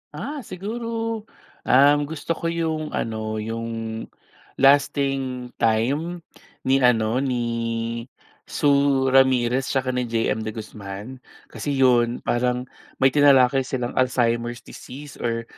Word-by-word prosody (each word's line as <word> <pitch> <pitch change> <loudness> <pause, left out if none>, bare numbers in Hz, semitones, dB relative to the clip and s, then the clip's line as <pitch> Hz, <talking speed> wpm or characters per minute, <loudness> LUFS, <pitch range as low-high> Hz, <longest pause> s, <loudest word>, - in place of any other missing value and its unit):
Ah 295 +1 -5
siguro, 225 +1 -4 0.4
ang 145 +3 +5
gusto 160 +2 -5
ko 165 0 -2
yung 160 -2 -2
ano, 110 -1 -3
yung 115 0 -5 0.5
"Lasting 135 -2 +2
Time" 140 +10 0 0.4
ni 135 +1 +3
ano, 120 -2 +3
ni 130 -3 -1 1.0
Sue 140 -2 +2
Ramirez 130 -1 +3
tsaka 130 -1 0
ni 125 -1 -2
JM 115 -1 -1
De 110 - -5
Guzman. 105 +3 -8 0.3
Kasi 145 -1 -3
'yon 125 -2 +3
parang 125 +1 0 0.4
may 135 - +6
tinalakay 135 -2 +4
silang 125 -2 -2
Alzheimer's 120 -1 0
disease 140 +2 -11
or 115 -1 -2
130 Hz, 110 wpm, -23 LUFS, 120-145 Hz, 1.0 s, may